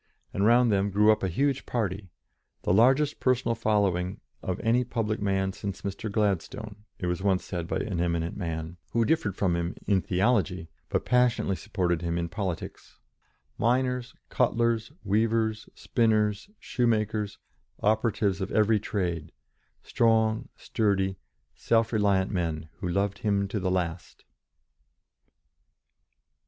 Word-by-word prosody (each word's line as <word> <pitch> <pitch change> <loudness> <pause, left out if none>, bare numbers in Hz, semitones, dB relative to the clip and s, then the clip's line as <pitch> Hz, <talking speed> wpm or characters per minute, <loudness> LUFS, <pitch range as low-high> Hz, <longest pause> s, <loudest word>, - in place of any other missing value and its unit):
And 100 - 0
round 120 0 +5
them 100 0 +2
grew 105 +2 +5
up 110 - +1
a 95 - 0
huge 135 - 0
party 100 -5 -2 0.5
"the - - +2
largest 135 +8 +4
personal 130 -2 +2
following 100 -5 0 0.2
of 90 -1 -3
any 120 +2 +3
public 110 -3 -2
man 95 -1 0
since 100 0 -6
Mr. 100 +2 -4
Gladstone," 105 +1 -2
it - - -4
was 90 0 -1
once 95 -2 +1
said 85 -3 -4
by - - -1
an 90 -5 -2
eminent 85 -1 -1
man 80 -2 -4 0.2
who 115 -1 +3
differed 150 - +1
from 95 -4 +1
him 85 +1 -2
in 100 -2 +2
theology, 95 -4 +1 0.2
but - - -1
passionately 125 -5 +2
supported 90 -5 -1
him 85 0 -1
in 85 -1 -2
politics; 95 -3 -5 0.6
miners, 125 +1 0
cutlers, 115 -1 +1
weavers, 110 +1 0
spinners, 110 - +1
shoemakers, 110 -4 0 0.5
operatives 105 -2 +1
of 95 - -2
every 110 0 +3
trade, 85 -6 -3 0.5
strong, 110 0 +2
sturdy, 95 -4 0 0.3
self 115 0 +1
reliant 100 -3 +2
men 80 -4 -2
who 90 - -3
loved 100 +2 0
him 100 -2 +1
to 105 +2 -3
the 95 -1 -1
last. 90 -2 -3
100 Hz, 135 wpm, -27 LUFS, 95-115 Hz, 0.6 s, round